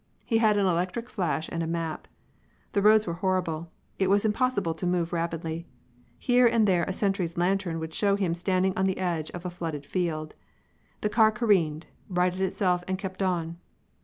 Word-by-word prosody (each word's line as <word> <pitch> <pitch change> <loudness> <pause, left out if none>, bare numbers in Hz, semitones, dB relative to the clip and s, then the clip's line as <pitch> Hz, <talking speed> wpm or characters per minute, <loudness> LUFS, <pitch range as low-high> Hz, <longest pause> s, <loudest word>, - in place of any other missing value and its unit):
He 225 -2 +2
had 215 -2 +4
an 200 - +2
electric 185 +7 -1
flash 165 -5 -1
and 165 - -3
a 165 - -2
map. 165 -1 -3 0.6
The 200 - +1
roads 215 +1 +6
were 170 - -2
horrible; 170 -4 -1 0.3
it 190 -1 +2
was 200 +2 +3
impossible 215 -6 +1
to 160 +3 -3
move 175 -1 0
rapidly. 165 0 -3 0.5
Here 245 -1 +4
and 230 -2 +3
there 175 -3 +3
a - - -3
sentry's 190 -4 -1
lantern 180 -1 0
would 160 0 -6
show 200 +2 +2
him 190 -4 0
standing 185 +2 +1
on 190 0 +1
the 190 - -1
edge 170 -4 -1
of 175 0 -8
a 180 - -3
flooded 160 -5 -5
field. 155 -4 -2 0.7
The 210 - 0
car 220 0 +5
careened, 185 -9 +1 0.2
righted 180 0 0
itself 185 -1 +1
and 190 0 -1
kept 190 0 -6
on. 170 -3 -1
185 Hz, 185 wpm, -27 LUFS, 165-200 Hz, 0.7 s, roads